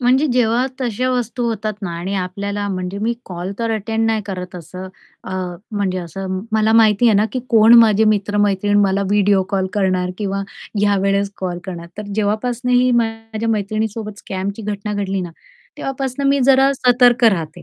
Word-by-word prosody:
म्हणजे 255 +4 +3
जेव्हा 240 0 +2
तशा 255 +1 -1
वस्तू 245 0 -2
होतात 215 -1 -2
ना 195 - -3
आणि 185 +4 -3
आपल्याला 200 +2 -3
म्हणजे 185 0 -4
मी 225 +3 0
कॉल 180 +1 -5
तर 230 -1 -1
अटेंड 225 +1 -1
नाही 220 -1 0
करत 185 -2 -6
असं 180 +2 -8 0.4
अ, 185 - -6 0.4
म्हणजे 200 -3 -1
असं 185 +2 -5
मला 220 0 +3
माहिती 225 0 +5
आहे 225 - +5
ना, 205 - +3
की 255 - -2
कोण 225 0 +6
माझे 220 -2 +5
मित्र-मैत्रीण 205 -1 +1
मला 195 0 +2
व्हिडिओ 205 -1 +3
कॉल 190 -1 0
करणार? 185 -2 0
किंवा 195 -2 -2 0.4
यावेळेस 200 0 +1
कॉल 180 -2 -4
करणार. 175 -3 -7
तर - - -3
जेव्हापासून 225 +4 -1
ही 250 0 +4
माझ्या 225 -1 -1
मैत्रिणीसोबत 215 0 -2
स्कॅमची 195 +3 -5
घटना 210 0 -4
घडली 195 -1 -2
ना, 175 -2 -5 0.5
तेव्हापासून 270 0 -3
मी 280 0 +2
जरा 270 +1 +5
सतर्क 245 -1 +4
राहते. 175 -6 +1
210 Hz, 165 wpm, -19 LUFS, 195-230 Hz, 0.5 s, कोण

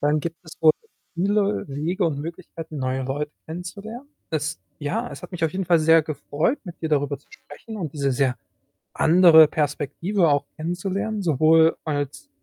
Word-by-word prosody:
dann 150 +1 +2
gibt 165 +1 -4
es 160 -2 -12
wohl 155 -1 +7 0.4
viele 200 +3 +1
Wege 165 +7 -1
und 155 -4 0
Möglichkeiten, 165 0 -7
neue 130 0 -1
Leute 145 +3 -3 0.2
kennenzulernen. 200 - -8 0.2
Es 155 0 -2 0.2
ja, 225 +12 -2
es - - -9
hat - - -9
mich 175 -3 -2
auf 160 - 0
jeden 190 0 -2
Fall 170 -1 +4
sehr 160 +1 +5
gefreut, 155 - -1
mit 175 -3 -10
dir 160 - -1
darüber 145 -2 0
zu - - -32
sprechen 230 - -11
und 165 -8 -4
diese 140 -2 0
sehr 130 0 +1 0.6
andere 165 -2 +7
Perspektive 155 +6 0
auch 145 0 +1
kennenzulernen, 195 +6 -3
sowohl 160 0 +4
als 145 -2 -3
160 Hz, 170 wpm, -23 LUFS, 145-180 Hz, 0.6 s, wohl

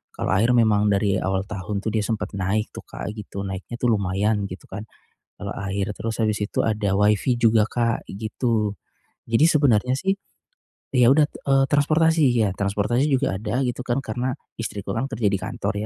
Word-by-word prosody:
Kalau - - -2
air 115 +6 +3
memang 105 -3 +4
dari 100 -1 +2
awal 95 0 -1
tahun 100 0 -4
tuh, 110 - -1
dia 110 - +1
sempat 105 -2 -2
naik 100 +3 -1
tuh, - - -9
Kak, - - -6
gitu 100 -2 -6
naiknya 95 +4 -6
tuh 120 -1 +2
lumayan 100 0 0
gitu, 95 0 -10
kan. 100 +2 -5 0.6
Eee, 100 -1 -4 0.2
air, 100 0 -1
terus 115 0 -3
habis 105 -1 +1
itu 105 - -1
ada 105 -3 0
Wi-Fi 105 +5 +3
juga, 115 -2 +4
Kak, 115 0 -1
gitu. 110 +1 -1 0.6
Jadi 115 +6 +4
sebenernya 130 -6 +3
sih, 195 +5 +1 0.8
ya, 125 -2 +5
udah, 150 +2 +5
eee 135 -2 +1
transportasi 160 +2 +3
ya, 110 -4 +2
transportasi 105 +7 0
juga 135 -6 +1
ada 115 +5 -1
gitu, 125 0 -3
kan 125 -1 -1
karena 125 +3 -2 0.2
istriku 100 -3 -4
kan 135 - -1
kerja 115 -5 0
di 100 - +1
kantor 100 +2 -3
110 Hz, 180 wpm, -23 LUFS, 100-125 Hz, 0.8 s, ya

